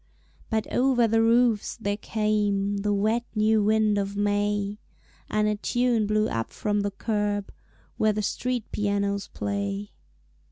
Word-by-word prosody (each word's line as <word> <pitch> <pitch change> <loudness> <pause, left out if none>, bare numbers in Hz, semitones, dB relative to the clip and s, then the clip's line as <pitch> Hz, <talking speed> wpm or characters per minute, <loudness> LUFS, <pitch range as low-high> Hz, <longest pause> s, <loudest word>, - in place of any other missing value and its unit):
But 220 -1 0
over 245 -2 +3
the 225 +1 +3
roofs 230 -1 +2
there 205 -3 -1
came 205 -2 0
The 205 +1 -1
wet 215 +4 +1
new 215 0 +3
wind 215 -1 +3
of 200 0 -3
May, 205 0 0 0.5
And 210 0 +1
a 210 0 0
tune 240 -1 +1
blew 215 +1 +2
up 115 0 -3
from 205 -1 -1
the 205 - -1
curb 205 0 -2 0.5
Where 215 - +3
the 210 0 -2
street 250 +2 -2
pianos 200 -1 -1
play. 200 0 -3
210 Hz, 145 wpm, -26 LUFS, 205-220 Hz, 0.5 s, over